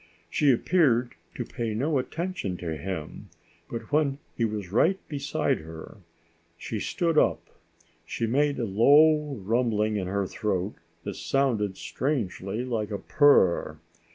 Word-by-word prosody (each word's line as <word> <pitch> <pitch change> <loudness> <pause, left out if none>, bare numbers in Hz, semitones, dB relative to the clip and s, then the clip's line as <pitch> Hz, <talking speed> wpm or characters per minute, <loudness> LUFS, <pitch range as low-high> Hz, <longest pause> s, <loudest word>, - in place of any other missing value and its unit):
She 145 -2 +4
appeared 125 -3 +2 0.2
to - - -4
pay 115 -2 -4
no 140 +5 +1
attention 160 - -3
to 80 -3 -4
him, 80 0 -6 0.4
but 115 0 -6
when 145 -2 +2 0.2
he 115 - +1
was 105 -4 -4
right 165 - +3
beside 145 -1 -1
her, 80 +4 -10 0.6
she 110 +4 -5
stood 165 - +1
up. - - +1 0.6
She 115 - -3
made 140 +5 +1
a 120 - -1
low 145 +8 +4
rumbling 110 0 0
in 95 -3 -2
her 100 +1 -1
throat 95 0 -2 0.3
that 100 -1 -5
sounded 115 -8 0
strangely 115 - -2
like 115 -4 -2
a 105 - -3
purr. 95 - +3
115 Hz, 135 wpm, -27 LUFS, 100-145 Hz, 0.6 s, She